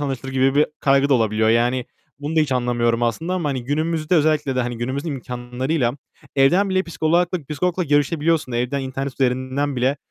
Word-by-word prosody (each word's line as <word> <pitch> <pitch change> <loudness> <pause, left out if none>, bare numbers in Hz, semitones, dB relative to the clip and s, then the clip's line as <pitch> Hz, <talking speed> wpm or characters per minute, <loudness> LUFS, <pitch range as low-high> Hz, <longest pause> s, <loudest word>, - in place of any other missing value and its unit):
anlaşılır 135 -2 -4
gibi 135 +1 +2
bir 150 - +4
kaygı 140 0 +3
da 140 - +4
olabiliyor. 110 -1 +2
Yani, 120 +2 +2 0.3
bunu 150 +3 -4
da 160 - +6
hiç 145 -3 +1
anlamıyorum 120 -1 +1
aslında 160 +11 -1
ama 170 -5 -1
hani 130 -3 -3
günümüzde 155 +4 0
özellikle 150 -4 +2
de, - - +2
hani, 120 -1 -4
günümüzün 130 +6 -3
imkânlarıyla 125 0 -2 0.4
evden 175 +9 +4
bile 190 0 +2
psikolagla 170 +2 0
psikologla 180 +4 -1
görüşebiliyorsun. 145 -1 +1
Evden 125 +4 -1
internet 135 0 -4
üzerinden 130 +2 -1
bile 130 +3 +1
135 Hz, 170 wpm, -21 LUFS, 125-155 Hz, 0.4 s, da